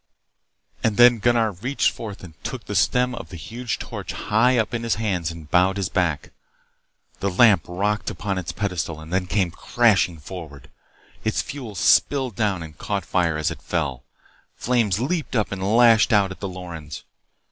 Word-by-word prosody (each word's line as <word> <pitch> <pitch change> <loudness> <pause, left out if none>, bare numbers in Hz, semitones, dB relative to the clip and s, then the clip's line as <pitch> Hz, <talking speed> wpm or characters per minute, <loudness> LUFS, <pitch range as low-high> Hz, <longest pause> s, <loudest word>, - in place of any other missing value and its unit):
And 110 -3 +1
then 120 -1 +7
Gunnar 115 -1 +2
reached 120 +10 0
forth 105 -4 -8
and 85 -3 -10
took - - -5
the - - -5
stem 125 0 +2
of 120 0 -7
the 90 - -8
huge 115 +7 -4
torch - - -6
high 115 +4 +2
up 110 0 0
in 120 - -1
his 115 -1 0
hands 95 -7 -1
and 80 -2 -9
bowed 95 +2 +3
his 95 -3 -1
back. 85 -6 -1 0.9
The 100 - 0
lamp 95 -3 +5
rocked 100 +4 -1
upon 100 -2 -3
its 85 - -5
pedestal 85 -6 -3
and 80 +2 -10
then 95 -1 0
came 95 -3 0
crashing 100 -4 +2
forward. 75 -2 -10 0.5
Its - - 0
fuel 125 -7 -7
spilled 120 +8 +3
down 100 -4 0
and 80 -2 -11
caught 100 -4 -3
fire 85 -4 +1
as 80 - 0
it - - -8
fell. 70 -7 -2 0.5
Flames 115 -6 +1
leaped 155 +3 -2
up 110 -3 0
and 95 -1 -4 0.2
lashed 115 -1 +6
out 100 -3 +3
at 95 - -9
the 100 - -4
Lorens. 85 -5 -8
100 Hz, 180 wpm, -23 LUFS, 85-115 Hz, 0.9 s, then